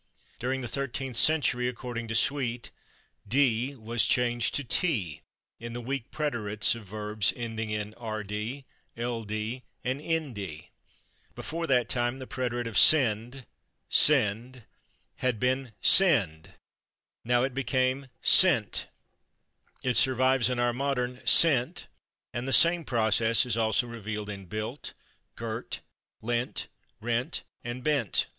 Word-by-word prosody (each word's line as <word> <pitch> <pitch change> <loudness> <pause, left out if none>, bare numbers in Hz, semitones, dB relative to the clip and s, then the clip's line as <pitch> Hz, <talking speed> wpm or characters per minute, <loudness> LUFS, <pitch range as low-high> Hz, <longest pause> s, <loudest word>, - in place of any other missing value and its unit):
During 130 +2 -2
the 125 - -4
thirteenth 135 0 -3
century, 125 -3 +3
according 120 -1 -5
to 110 - -4
Sweet, 120 -1 0 0.6
"/d/ 130 +2 +1
was 115 0 0
changed 120 -2 +1
to 145 - 0
/t/ 120 - -1 0.4
in 115 0 -7
the 120 - -5
weak 125 0 -4
preterites 110 -9 -1
of 115 -4 -10
verbs 105 0 -1
[ending] 115 -2 -5
in 105 0 -4
/rd/, 110 +3 -5 0.3
/ld/ 115 0 -4 0.2
and 130 +4 -2
/nd/." 120 - -4 0.7
Before 165 +1 -4
that 125 -4 +2
time 120 +1 -1
the 130 - -8
preterite 120 -2 -3
of 115 -2 -3
/sende/ 125 -2 +4 0.5
(/send/) 115 +4 +3 0.5
had 125 -4 -1
been 130 0 0
/sende/; 100 - +4 0.7
now 120 +1 +2
it 135 0 -1
became 130 +1 0 0.2
/sente/. 145 - +5 1.0
It 125 -1 +2
survives 130 -1 +4
in 125 - -2
our 120 0 +1
modern 125 -1 -2
/sent/, 130 -3 +4 0.5
and 120 +2 -4
the 135 - -1
same 170 0 +4
process 110 -1 +2
is 125 - -1
also 115 +1 +1
revealed 105 -3 -6
in 100 -2 -9
/built/, 110 +8 -6 0.4
/girt/, - - -5 0.4
/lent/, 120 +2 -2 0.3
/rent/ 120 +2 -1 0.2
and 120 +1 -6
/bent 145 -10 +1
120 Hz, 125 wpm, -28 LUFS, 110-130 Hz, 1.0 s, sente